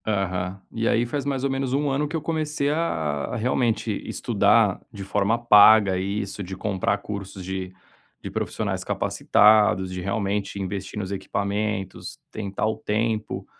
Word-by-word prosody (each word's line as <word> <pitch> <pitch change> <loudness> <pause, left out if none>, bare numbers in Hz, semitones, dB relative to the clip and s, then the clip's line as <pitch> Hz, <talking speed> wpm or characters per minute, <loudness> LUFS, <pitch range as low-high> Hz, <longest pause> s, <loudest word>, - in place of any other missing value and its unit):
Aham. 95 -2 -1
E 115 0 -1
aí 120 +1 +2
faz 140 +3 -3
mais 135 -2 -1
ou 140 - +1
menos 135 -1 -1
1 145 +1 +1
ano 145 +2 0
que 155 - -5
eu 160 - -1
comecei 155 -2 -1
a 115 - 0 0.2
a - - -3
realmente 115 -1 0 0.2
estudar - - +2
de 100 - -7
forma 100 +3 +1
paga 105 -4 +6
isso, 100 +2 -3
de 95 0 -6
comprar 100 0 0
cursos 100 -2 -7
de 95 0 -4 0.5
de - - -5
profissionais - - -3
capacitados, 105 -3 +3
de 90 - -4
realmente 100 0 -2
investir 95 +1 -4
nos 95 -1 -4
equipamentos, 100 0 -3
tentar 100 0 -2
o 110 - -1
tempo. 110 0 -2
105 Hz, 155 wpm, -24 LUFS, 95-120 Hz, 0.5 s, paga